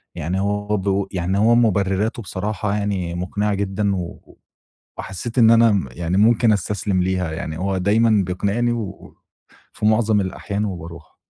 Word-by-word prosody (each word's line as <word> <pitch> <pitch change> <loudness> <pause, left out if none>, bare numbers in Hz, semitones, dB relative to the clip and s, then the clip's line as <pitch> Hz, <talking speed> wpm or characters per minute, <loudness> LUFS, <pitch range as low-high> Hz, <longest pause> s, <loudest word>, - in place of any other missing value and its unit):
يعني 90 +5 -2
هو 105 +1 -1
برضه 100 -1 0
يعني 95 +1 -1
هو 115 +3 +4
مُبرِراته 105 -1 +1
بصراحة 105 +2 -3
يعني 100 -4 -2
مُقنعة 100 +4 -1
جدًا، 100 0 -1
و 90 -2 -7 0.6
وحسّيت 115 +7 -5
إن 115 -2 +7
أنا 115 -1 +6
م 95 -9 0
يعني 85 +6 -2
ممكن 115 +2 +4
استسلِم 100 -1 -1
ليها، 90 -2 -1
يعني 80 0 -5
هو 95 +1 -1
دايمًا 105 +2 +3
بيقنِعني 100 +6 0
و 110 -5 -6 0.6
في - - -2
مُعظم 110 -1 +3
الأحيان 100 +2 -3
وبارُوح. 85 -4 -8
100 Hz, 150 wpm, -21 LUFS, 95-105 Hz, 0.6 s, إن